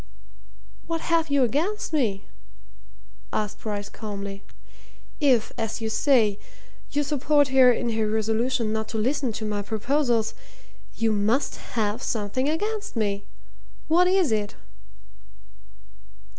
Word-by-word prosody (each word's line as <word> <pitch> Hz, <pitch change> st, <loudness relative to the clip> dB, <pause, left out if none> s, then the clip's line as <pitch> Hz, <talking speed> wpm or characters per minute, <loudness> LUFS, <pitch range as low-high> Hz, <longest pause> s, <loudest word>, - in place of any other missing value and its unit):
"What 330 Hz, -1 st, -2 dB
have 330 Hz, -2 st, +1 dB
you 280 Hz, -2 st, +3 dB
against 320 Hz, -, -1 dB
me?" 220 Hz, -10 st, 0 dB, 1.1 s
asked 210 Hz, -1 st, -2 dB
Bryce 205 Hz, -2 st, -4 dB
calmly. 200 Hz, -2 st, -6 dB, 0.8 s
"If, 260 Hz, -8 st, +3 dB
as 225 Hz, 0 st, -2 dB
you 225 Hz, -1 st, -2 dB
say, 220 Hz, -6 st, +3 dB, 0.5 s
you 290 Hz, -, 0 dB
support 290 Hz, 0 st, +2 dB
her 260 Hz, -1 st, +7 dB
in 235 Hz, 0 st, -1 dB
her 220 Hz, -1 st, 0 dB
resolution 220 Hz, +1 st, 0 dB
not 220 Hz, 0 st, -2 dB
to 225 Hz, -, -4 dB
listen 255 Hz, +3 st, 0 dB
to 220 Hz, -, -4 dB
my 210 Hz, -1 st, -1 dB
proposals, 230 Hz, +2 st, 0 dB, 0.6 s
you 225 Hz, -1 st, +1 dB
must 215 Hz, +6 st, +1 dB, 0.2 s
have 215 Hz, +2 st, 0 dB
something 230 Hz, +5 st, -1 dB
against 420 Hz, +5 st, -2 dB
me. 205 Hz, -2 st, -1 dB, 0.6 s
What 350 Hz, +3 st, +5 dB
is 365 Hz, -7 st, +3 dB
it?" 210 Hz, -1 st, -1 dB
230 Hz, 120 wpm, -25 LUFS, 215-285 Hz, 1.1 s, her